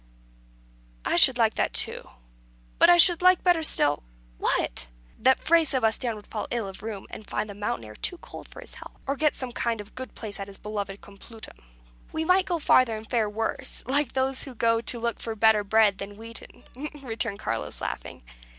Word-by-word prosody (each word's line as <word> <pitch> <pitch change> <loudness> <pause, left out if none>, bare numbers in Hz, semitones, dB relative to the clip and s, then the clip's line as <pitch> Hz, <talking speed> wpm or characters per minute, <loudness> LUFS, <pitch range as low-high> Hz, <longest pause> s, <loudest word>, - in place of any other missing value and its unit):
"I - - +1
should - - +7
like - - +3
that - - -1
too. - - 0 0.7
But - - +7
I 350 - +8
should 345 0 +6
like 365 0 +5
better 355 -3 +4
still 145 - +3 0.2
" - - -30
"What!" 65 - 0 0.3
"That 260 - +4
Fray 335 0 +5
Sebastian 240 -4 0
would 210 -1 -11
fall 215 - -5
ill 235 -4 -2
of 195 - -8
the 220 - -7
rheum, 205 -3 -6
and 215 - -9
find 210 0 -2
the 205 - -8
mountain 200 - -3
air 105 0 -11
too 355 - -1
cold - - -11
for - - -12
his - - -7
health; - - -12
or 275 - -1
get 305 +1 +1
some 255 -2 -4
kind 235 -2 -1
of 205 0 -10
good 255 0 -8
place 210 -3 -6
at 195 - -5
his 195 -1 -9
beloved 205 -2 -5
Complutum." 210 +3 -13 0.5
"We 320 0 -2
might 370 +2 +3
go 350 - 0
farther 255 -7 +3
and 215 0 -10
fare 225 -3 +1
worse, 220 +2 -2
like 280 +1 +1
those 265 0 0
that 260 -4 -10
go 230 0 +2
to 235 +1 0
look 235 -1 -2
for 225 -1 -5
better 220 -1 +4
bread 205 -1 +3
than 200 +1 -7
wheaten," 230 +1 -10 0.4
returned 225 -4 -2
Carlos, 115 - -3
laughing. 60 0 -6
225 Hz, 205 wpm, -26 LUFS, 205-265 Hz, 0.7 s, I